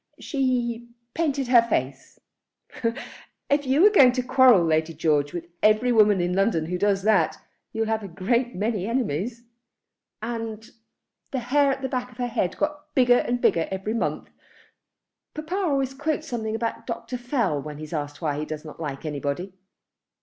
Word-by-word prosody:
"She 240 -4 -1 0.2
painted 285 -5 -1
her 245 -2 +7
face." 135 - -3 1.3
"If 285 -1 +2
you're 315 +11 +5
going 265 - +6
to 255 -1 -1
quarrel, 250 -6 +5
Lady 160 0 0
George, 145 -2 +1
with 175 -1 -5 0.2
every 215 +4 +4
woman 210 -4 +5
in 175 0 0
London 195 -4 +1
who 180 +2 -3
does 200 -1 +1
that, 200 -7 +3 0.3
you'll 225 0 -1
have 220 0 -1
a 200 - -7
great 235 +8 -1
many 205 0 -1
enemies." 230 - -2 0.8
"And 225 -1 -5 0.6
the 270 - -3
hair 275 +3 +2
at 270 0 -4
the - - 0
back 250 -1 -3
of 240 - -18
her 250 - -1
head 225 -7 -2
got 300 0 -3
bigger 245 -2 +5
and 245 0 -1
bigger 165 -8 +2
every 195 +3 -3
month. 230 - -2 1.0
Papa 310 +3 -6
always 280 -9 0
quotes 310 +3 -2
something 225 -4 -3
about 230 0 -4
Dr. 230 +1 -5
Fell 240 - 0
when 150 0 -8
he's 155 +2 -8
asked 145 0 -4
why 145 -2 -1
he 155 - -3
does 155 0 -7
not 155 - -10
like 145 -2 -5
anybody. 150 +5 -3
225 Hz, 165 wpm, -25 LUFS, 175-255 Hz, 1.3 s, her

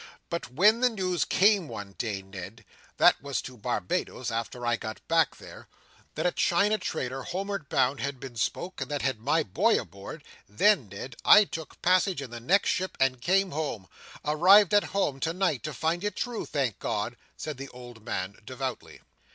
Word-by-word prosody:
"But 170 -6 -4
when 205 - +5
the 250 - +5
news 185 -6 -1
come 200 -3 +3
one 100 -5 -7
day, 100 -5 -2
Ned,—that 95 +2 -1
was 140 -1 -2
to 130 - -8
Barbados, 105 +3 -2
after 115 +2 -4
I 120 0 +2
got 110 -1 -8
back 165 -1 +3
there,—that - - -11
a 180 - +3
China 205 +6 +2
trader 135 -7 -3
home'ard 195 +1 -4
bound 130 +1 +2
had 140 -1 -3
been 130 -2 -9
spoke, 175 +10 -2
that 145 -2 -3
had 130 -5 0
my 150 +7 +2
boy 95 - +2
aboard, - - -9 0.3
then, 130 - +3
Ned, 115 +6 -8
I 210 - +8
took 165 -6 -8
passage 185 0 +3
in 135 -4 -7
the 120 - -6
next 180 +12 +2
ship 185 +1 -2
and 130 -2 +2
came 190 +6 +2
home; 140 -10 -3 0.4
arrived 185 +7 +6
at 205 - +5
home 150 -9 -1
tonight 165 -2 0
to 155 - -3
find 165 +6 -1
it 205 -2 -2
true, 240 -2 -3
thank 135 -8 -1
God!" 110 +2 -2 0.2
said 155 -4 -5
the 135 0 -7
old 120 -3 -12
man, 100 -3 -4
devoutly. 130 +2 -6
140 Hz, 175 wpm, -28 LUFS, 120-185 Hz, 0.4 s, I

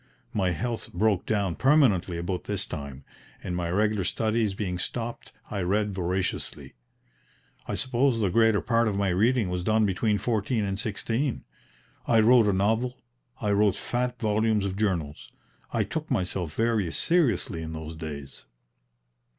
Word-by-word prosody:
My 95 -3 +1
health 115 +8 -3
broke 100 0 +1
down 100 -5 +1
permanently 125 - +3
about 90 +2 -3
this - - -2
time, 70 -1 -7 0.4
and 90 - -3
my 85 -1 -2
regular 105 +2 +1
studies 110 +2 0
being 90 -3 -3
stopped 115 +4 -4 0.2
I 100 - -2
read 100 +3 0
voraciously. 95 0 -2 0.9
I - - -2
suppose 130 -1 +1
the 100 -4 +1
greater 110 -1 +4
part 115 0 +2
of 100 -2 -1
my 100 -1 +1
reading 110 +3 +2
was 90 0 -2
done 110 +2 +3
between 105 +2 +1
fourteen 110 0 0
and 100 0 -3
sixteen. 115 +5 -2 0.6
I 115 - +5
wrote 115 0 +6
a - - +4
novel, 110 +6 +1 0.4
I 105 -3 0
wrote 100 -1 +3
fat 125 +3 -2
volumes 110 -1 +1
of 95 -1 -2
journals; 90 -8 -2 0.4
I - - +1
took 155 -1 -4
myself 90 - -2
very 110 -6 +1
seriously 120 - +1
in 80 0 -6
those 80 0 -6
days." 75 -4 -8
105 Hz, 150 wpm, -27 LUFS, 90-115 Hz, 0.9 s, wrote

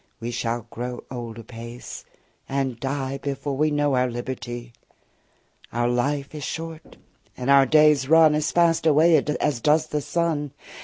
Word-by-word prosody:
We 115 +1 -4
shall 120 0 -2
grow 120 +1 -5
old 120 -3 -6
apace, 115 +1 -9 0.4
and 135 -3 -2
die 135 0 -3
Before 140 0 -3
we 155 +3 +2
know 145 -1 +1
our 125 0 +2
liberty. 120 0 -6 0.9
60 - - -31
Our 120 +1 +1
life 140 +4 -1
is 150 -2 -6
short, 165 +1 -7 0.4
and 125 +2 0
our 135 -1 +6
days 150 -2 +4
run 160 -1 +6
As 150 0 0
fast 165 -1 +3
away 160 +2 +5 0.2
as 145 -5 0
does 155 +4 +3
the 150 - -3
sun. 150 -3 -1
135 Hz, 155 wpm, -24 LUFS, 120-150 Hz, 0.9 s, our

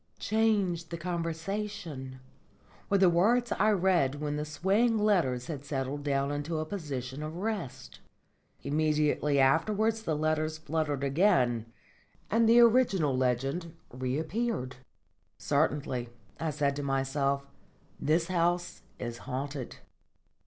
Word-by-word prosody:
"Change 205 -6 +1
the 170 - -4
conversation," 170 -4 -4 0.7
were 200 - +4
the 190 -1 +5
words 225 +8 +3
I 215 +3 +3
read 180 -9 +2
when 150 0 -3
the 150 0 -2
swaying 195 +10 +2
letters 170 - +2
had 145 -4 -6
settled 140 0 -3
down 140 -1 0
into 145 +3 -3
a 155 - -2
position 145 -7 -5
of 155 +1 -5
rest. 195 - -5 0.6
Immediately 150 -1 +1
afterwards 210 +11 +2
the 165 -8 -1
letters 155 0 0
fluttered 155 -2 -2
again 135 - +2 0.6
and 225 0 +4
the 235 +1 +7
original 220 - +4
legend 135 +7 -1 0.2
reappeared. 140 - -2 0.6
"Certainly," 130 -4 0 0.3
I 160 - -1
said 140 -1 0
to - - -2
myself, 140 0 0 0.6
"this 160 +3 +2
house 175 0 0 0.2
is 120 -1 -5
haunted." 135 0 -4
155 Hz, 115 wpm, -30 LUFS, 140-190 Hz, 0.7 s, the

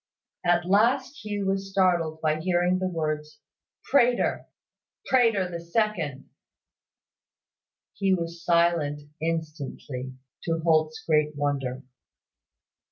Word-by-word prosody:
At 175 0 +2
last 230 +9 +2
Hugh 205 -2 -3
was 195 0 -1
startled 175 -5 +1
by 155 0 +1
hearing 180 +1 +1
the 185 - 0
words 155 -3 -3 0.5
"Prater", 245 -3 +2 0.6
"Prater 225 -7 +3
the 170 -1 -5
second." 170 - -1 1.7
He 195 -1 0
was 170 -2 -2
silent 170 -4 +2 0.2
instantly, 150 -5 -4 0.3
to 165 -1 0
Holt's 155 -1 +2
great 150 -1 +2
wonder. 135 -3 -2
170 Hz, 100 wpm, -26 LUFS, 155-190 Hz, 1.7 s, Prater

